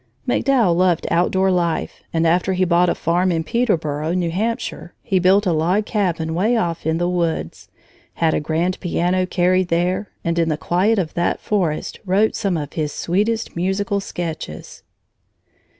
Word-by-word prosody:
MacDowell 235 -11 +2
loved 180 -2 +2
outdoor 190 +3 +2
life, 170 -2 -1
and 165 0 +1
after 180 +3 +2
he 185 0 +2
bought 175 0 +3
a - - 0
farm 175 +3 +1
at 165 -1 -1
Peterboro, 160 -7 0
New 175 -2 0
Hampshire, 215 -2 -3
he 190 - +1
built 190 +3 +4
a 180 - +2
log 175 +7 +1
cabin 170 -7 -1
way 215 +8 +2
off 170 -7 -2
in 160 0 +1
the 175 +1 0
woods, 170 -2 -2 0.5
had 165 -1 +1
a - - +1
grand 165 +4 -1
piano 180 +1 0
carried 185 +1 +2
there, 180 +4 0
and 170 0 0
in 165 -1 +2
the 155 - 0
quiet 190 +8 +1
of 170 -5 -1
that 175 - 0
forest 180 -8 -2
wrote 200 +3 +2
some 195 -5 0
of 145 -2 -5
his 150 -2 -2
sweetest 210 +9 -1
musical 195 +3 -1
sketches. 165 - -6
180 Hz, 165 wpm, -20 LUFS, 165-190 Hz, 0.5 s, built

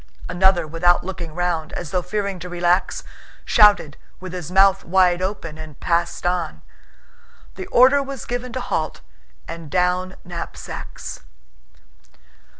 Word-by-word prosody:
Another, 185 -2 +3
without 165 +3 +2
looking 170 -4 -6
round, 175 -2 -1
as 170 -4 -5
though 180 - +1
fearing 200 -1 -3
to 180 - -7
relax, 175 +1 +1 0.4
shouted 205 -9 +5 0.2
with 185 -1 -8
his 180 -4 -5
mouth 195 0 +5
wide 180 0 +3
open 185 -5 -4
and 155 -3 -10
passed 170 0 0
on. 175 -2 -1 0.9
The 375 - -7
order 265 -2 +6
was 275 -2 -6
given 245 +1 -4
to 260 - -3
halt - - -2 0.5
and 165 -2 -7
down 180 +2 +1
knapsacks. 175 -1 -7
180 Hz, 130 wpm, -22 LUFS, 170-195 Hz, 0.9 s, order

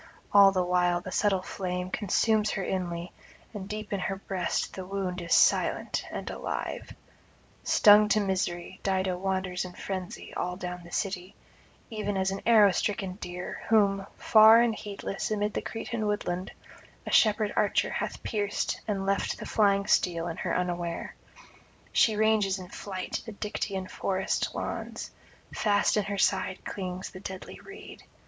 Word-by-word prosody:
all 200 -1 +8
the 185 -1 +1
while 180 0 +2
the 185 +1 -8
subtle 195 -2 +1
flame 180 -1 -4
consumes 215 +1 +2
her 195 - -2
inly, 175 -2 -3 0.4
and 200 -2 -7
deep 215 0 -5
in 200 - 0
her 195 +1 -2
breast 190 -2 -2
the 190 - -6
wound 185 -1 -3
is 170 - -8
silent - - +3
and - - -5
alive. - - -5 0.7
Stung 210 0 +6
to 215 - +4
misery, 185 -2 -2
Dido 190 -1 0
wanders 185 0 -2
in 180 -1 -8
frenzy 185 -1 -6
all 180 0 -2
down 180 -1 -6
the 170 - -13
city, 185 -1 -3 0.6
even 205 -2 -2
as 190 0 +1
an 195 - -4
arrow 215 -4 +7
stricken 195 0 -1
deer, 180 -2 -6
whom, 200 -3 +3
far 220 +1 +7
and 235 -1 +3
heedless 200 -2 -5
amid 210 -1 -1
the - - -2
Cretan 225 -1 -4
woodland, 185 -3 -2 0.6
a - - -4
shepherd 215 -1 +4
archer 205 - +2
hath - - -4
pierced 205 -3 -2
and 195 -2 -1
left 195 0 0
the - - -7
flying 200 -2 +2
steel 170 -4 +2
in 170 - -5
her - - -1
unaware; 175 -1 -3 0.8
she 220 - +4
ranges 210 -2 +2
in 180 -1 -9
flight 190 -2 -5
the 220 - -6
Dictaean 200 -2 -3
forest 190 0 -1
lawns; - - -5 0.4
fast 205 -1 +2
in 210 -2 +1
her 200 0 -3
side 190 -1 0
clings 185 -1 -5
the 185 - -10
deadly 190 -1 -8
reed. 395 +1 -11
195 Hz, 155 wpm, -28 LUFS, 180-210 Hz, 0.8 s, all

